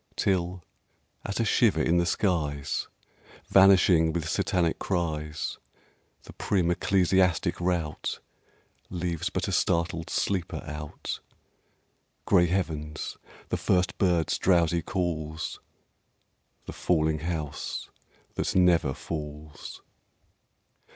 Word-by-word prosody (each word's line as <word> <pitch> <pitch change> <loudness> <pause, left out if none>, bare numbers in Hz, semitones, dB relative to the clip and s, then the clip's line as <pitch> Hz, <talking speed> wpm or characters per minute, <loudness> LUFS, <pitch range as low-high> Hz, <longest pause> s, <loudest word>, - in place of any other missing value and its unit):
Till, 90 -1 0 0.6
at 100 - -3
a 115 - +2
shiver 105 -5 +3
in 85 - +3
the 85 0 +2
skies, 75 -8 0 0.6
Vanishing 95 -4 +6
with 80 -1 -2
Satanic 90 -2 0
cries, 75 -4 -2 0.6
The - - -12
prim 90 -4 +1
ecclesiastic 90 -1 +2
rout 85 -4 -1 0.7
Leaves 85 -1 -2
but - - -2
a - - -2
startled 85 -1 0
sleeper 95 -4 -1
out, 75 0 -6 1.1
Grey 90 -3 +5
heavens, 80 -4 -3 0.3
the - - 0
first 90 -1 +1
bird's 90 -4 +2
drowsy 85 -2 +3
calls, 80 -3 -3 1.1
The - - -7
falling 80 -3 +1
house 80 -3 -4 0.4
that - - -2
never 85 -7 +4
falls. 75 -1 -7
85 Hz, 95 wpm, -27 LUFS, 80-90 Hz, 1.1 s, Vanishing